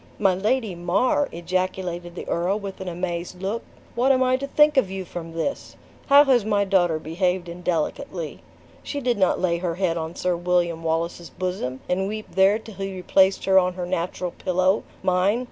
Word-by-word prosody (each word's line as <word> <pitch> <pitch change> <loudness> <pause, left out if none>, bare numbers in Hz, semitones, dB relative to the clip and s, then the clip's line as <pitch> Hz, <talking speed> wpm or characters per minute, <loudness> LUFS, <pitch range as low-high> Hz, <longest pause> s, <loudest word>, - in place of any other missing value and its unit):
"My 195 -3 +3
Lady 215 +3 0
Mar!" 195 +11 +1
ejaculated 175 0 -3
the - - -7
earl, 180 +4 0
with 195 -2 -7
an 190 - -6
amazed 175 0 -4
look, 200 +5 -2 0.3
"what 250 +3 +3
am 260 -1 +4
I 255 0 +3
to 275 +1 -4
think 300 +1 +4
of 260 -9 +3
you 190 -1 -5
from 165 -1 -7
this? 165 - -3 0.3
How 285 +1 +8
has 260 -5 +3
my 205 -1 +1
daughter 175 -4 +2
behaved 180 +3 -1
indelicately? 170 -1 -3 0.4
She 285 - -4
did 245 -5 0
not 185 - +3
lay 170 -2 +1
her 170 -2 -2
head 180 -2 0
on 160 +1 -5
Sir 180 -1 0
William 175 -1 0
Wallace's 165 +1 -2
bosom 180 -9 -4
and 190 +2 0
weep 215 +1 -6
there 195 +2 +5
till 220 -1 -11
he 195 -1 -4
replaced 190 +1 +2
her 190 0 +6
on 180 0 0
her 180 -1 -3
natural 175 +1 -2
pillow, 185 +2 +1 0.2
mine. 190 +4 +2
185 Hz, 185 wpm, -24 LUFS, 175-200 Hz, 0.4 s, How